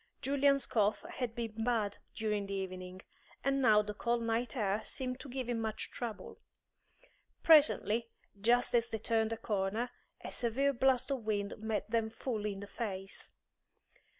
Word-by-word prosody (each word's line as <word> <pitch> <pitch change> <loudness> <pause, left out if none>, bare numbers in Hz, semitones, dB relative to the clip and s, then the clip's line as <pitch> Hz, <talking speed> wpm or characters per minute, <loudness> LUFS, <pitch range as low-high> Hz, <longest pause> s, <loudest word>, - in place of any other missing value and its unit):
Julian's 275 -1 +3
cough 210 +3 +1
had 250 -10 -4
been 225 -2 -3
bad 220 -4 0 0.2
during 210 -2 -1
the 195 - -3
evening, 185 -1 -5 0.4
and 275 0 +2
now 210 -4 +6
the 210 0 -5
cold 235 +2 0
night 230 +3 -1
air 210 -3 +1
seemed 255 -1 -4
to 275 - -9
give 255 -1 -3
him 240 -2 -1
much 220 -1 -3
trouble. 230 -4 -6 1.0
Presently, 240 -7 +5 0.3
just 240 +3 +3
as 235 0 +3
they 220 - -2
turned 225 0 +1
a 225 - -1
corner, 215 +2 -1 0.3
a - - -6
severe 270 +4 +1
blast 260 +1 +2
of 265 -4 -1
wind 205 -2 -1
met 220 0 -2
them 225 -1 +1
full 220 -2 -3
in 200 -1 -4
the 200 - -7
face. 195 -4 -5
225 Hz, 160 wpm, -34 LUFS, 210-245 Hz, 1.0 s, now